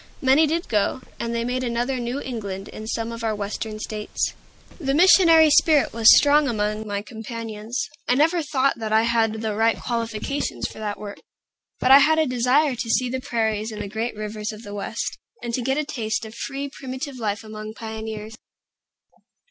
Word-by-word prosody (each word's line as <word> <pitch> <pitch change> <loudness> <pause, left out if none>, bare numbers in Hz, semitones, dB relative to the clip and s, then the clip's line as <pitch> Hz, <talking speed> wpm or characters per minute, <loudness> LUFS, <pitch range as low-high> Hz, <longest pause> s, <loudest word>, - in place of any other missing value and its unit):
Many 275 +4 +4
did 335 +3 -1
go, 215 +4 0 0.2
and 235 0 -2
they 230 0 -1
made 255 +1 -1
another 245 +2 -1
New 240 +3 -3
England 200 -7 -5
in 215 - -8
some 230 0 -2
of 230 0 -7
our 220 -1 0
Western 210 +1 -4
States. 215 -1 -3 0.5
The 275 -4 0
missionary 330 -2 +7
spirit 300 -1 +4
was 225 -1 +2
strong 290 0 +4
among 215 -2 -1
my 200 0 -3
companions. 225 +1 -5 0.2
I 245 - +3
never 325 +5 +3
thought 275 -4 0
that 220 -1 -4
I 220 +1 +4
had 225 -2 +1
the 220 -1 -1
right 225 +2 +2
qualifications 230 - -3
for - - -11
that 210 -1 -4
work; 205 -1 -8 0.6
but 255 - +3
I 275 - +11
had 315 +3 +4
a 315 - +3
desire 255 +3 +2
to 235 -1 -4
see 245 +2 +1
the 260 0 -3
prairies 220 -2 -1
and 215 - -7
the 205 - -4
great 220 +3 -3
rivers 215 0 -4
of 215 +1 -11
the 205 - -8
West, 210 +2 -4 0.2
and 235 -1 -4
to 250 - 0
get 265 +3 0
a 305 - 0
taste 225 -6 -3
of 220 - -9
free, 275 +4 -4
primitive 265 0 -7
life 210 -2 -2
among 215 0 -8
pioneers. 220 -1 -6
230 Hz, 190 wpm, -23 LUFS, 215-265 Hz, 0.6 s, I